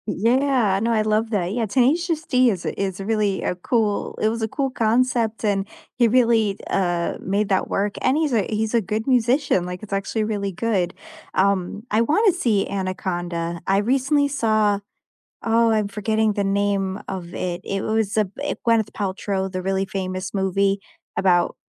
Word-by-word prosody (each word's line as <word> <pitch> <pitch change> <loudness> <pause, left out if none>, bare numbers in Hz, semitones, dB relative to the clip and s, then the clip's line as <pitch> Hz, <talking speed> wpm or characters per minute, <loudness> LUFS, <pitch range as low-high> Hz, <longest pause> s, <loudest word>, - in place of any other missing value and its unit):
Yeah, 235 -2 +2
no, 230 +1 +1
I 220 -2 +2
love 215 +1 +1
that. 195 -4 -1
Yeah, 230 -1 -1
Tenacious 310 - +1
D 255 -1 +4
is 190 -6 -3
a - - -4
is 190 -1 -2
really 205 -1 0
a - - 0
cool 210 +2 -1
it 215 - +2
was 230 +1 -3
a 220 - 0
cool 270 +3 -2
concept 230 -1 +1
and 200 -1 0 0.3
he 240 - +6
really, 225 -4 +3
uh, 175 -3 0
made 200 +2 -1
that 190 -1 +1
work 200 0 -1
and 270 - +2
he's 310 -4 0
a 215 -4 +1
he's 220 +1 -1
a 235 - +3
good 215 +3 -3
musician, 250 -5 +2
like, 180 +1 -6
it's 200 - -7
actually 195 +3 -1
really 205 -2 -2
good. 190 -2 -1 0.4
Um, 195 +1 +1
I 215 +2 +3
wanna 375 - +4
see 235 - +1
Anaconda. 175 -3 -3
I 195 - +3
recently 270 +6 +2
saw 215 -6 +1 0.7
oh, 230 0 +3
I'm 215 -2 +1
forgetting 215 +1 0
the 200 -1 -1
name 195 -1 0
of 180 -2 -6
it. 175 -1 -3
It 195 0 -2
was 220 -2 0
a 215 -3 +1
it 290 +1 -3
Gwyneth 225 -2 +2
Paltrow, 190 -1 -2
the 185 0 -3
really 190 +1 0
famous 185 -1 -4
movie 195 0 +1 0.4
about 175 -2 +2
210 Hz, 175 wpm, -22 LUFS, 195-230 Hz, 0.7 s, he